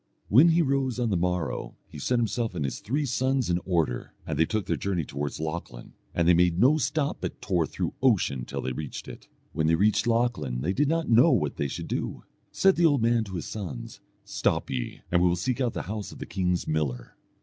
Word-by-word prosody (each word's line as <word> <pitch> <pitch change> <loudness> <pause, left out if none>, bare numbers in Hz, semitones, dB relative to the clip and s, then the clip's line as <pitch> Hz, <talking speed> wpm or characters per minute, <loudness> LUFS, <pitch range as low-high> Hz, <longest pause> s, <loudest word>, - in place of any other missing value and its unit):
When 140 +11 +7
he 165 +1 +4
rose 135 -3 0
on 120 -3 0
the - - +2
morrow, 90 -1 -2
he 75 - -10
set 125 - +1
himself 115 -3 -1
and 75 -5 -1
his 65 -3 -3
three 135 +9 -1
sons 130 -4 0
in 85 - +2
order, 85 -9 -1
and - - -3
they 80 - +4
took 110 -3 -1
their - - 0
journey 90 -5 -2
towards 70 +1 -4
Lochlann, 80 -6 -6 0.2
and 85 -1 +2
they 90 - +7
made 85 0 +3
no 140 +8 +5
stop 145 +1 -1
but - - -4
tore 90 -6 0
through - - -3
ocean 100 - +2
till - - -5
they 65 - -2
reached 75 +1 -6
it. - - -10 0.3
When 80 +1 +1
they 80 - +4
reached 105 +6 +2
Lochlann 115 - 0
they 90 +8 0
did 145 +7 +2
not 165 +2 0
know 115 +1 +6
what - - +1
they 70 - 0
should - - -6
do. - - -3 0.3
Said 195 0 +3
the 170 - +4
old 140 -6 +2
man 115 0 +3
to 95 -2 -7
his 85 - -4
sons, 80 - -6 0.3
"Stop - - -1
ye, 60 -2 -4
and 90 0 +3
we 90 - +5
will 85 - +2
seek 125 +9 -2
out 120 -3 0
the - - -3
house 105 +2 -5
of - - -11
the - - -6
king's 90 -2 -1
miller." 70 -6 -2
95 Hz, 230 wpm, -27 LUFS, 80-125 Hz, 0.3 s, When